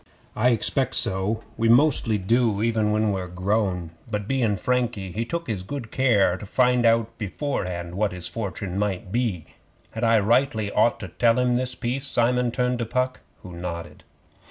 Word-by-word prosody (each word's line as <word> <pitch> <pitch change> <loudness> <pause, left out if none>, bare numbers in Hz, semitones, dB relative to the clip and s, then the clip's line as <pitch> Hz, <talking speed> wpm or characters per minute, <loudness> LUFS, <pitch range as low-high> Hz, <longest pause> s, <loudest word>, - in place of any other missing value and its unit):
'I 120 +4 +3
expect 130 +3 0
so. 95 +4 0
We 115 0 +2
mostly 120 -3 +4
do 110 +1 +1
even 110 -2 +1
when 105 0 +1
we're 95 -2 -3
grown. 90 -1 -1 0.2
But 105 -2 -3
bein' 120 -5 +1
Frankie, 120 -4 -1
he 115 +5 -2
took 170 +6 -3 0.2
good 135 -6 -6
care 105 -9 +3
to 100 - -9
find 125 +1 +3
out 115 0 +2
beforehand 90 -7 -3
what 100 +2 0
his 90 -1 -5
fortune 95 -1 -4
might 100 -2 -2
be. 110 -8 -1 0.5
Had 115 - -5
I 115 -1 +5
rightly 110 -1 +2
ought - - +2
to - - -6
tell 115 -1 +2
'em 125 -1 +2
this 125 0 -1
piece?' 130 +4 -2
Simon 125 0 +2
turned 125 +1 -1
to 120 - -1
Puck, 130 +2 -1 0.2
who 95 - -9
nodded. 85 -1 -6
115 Hz, 170 wpm, -24 LUFS, 95-125 Hz, 0.5 s, I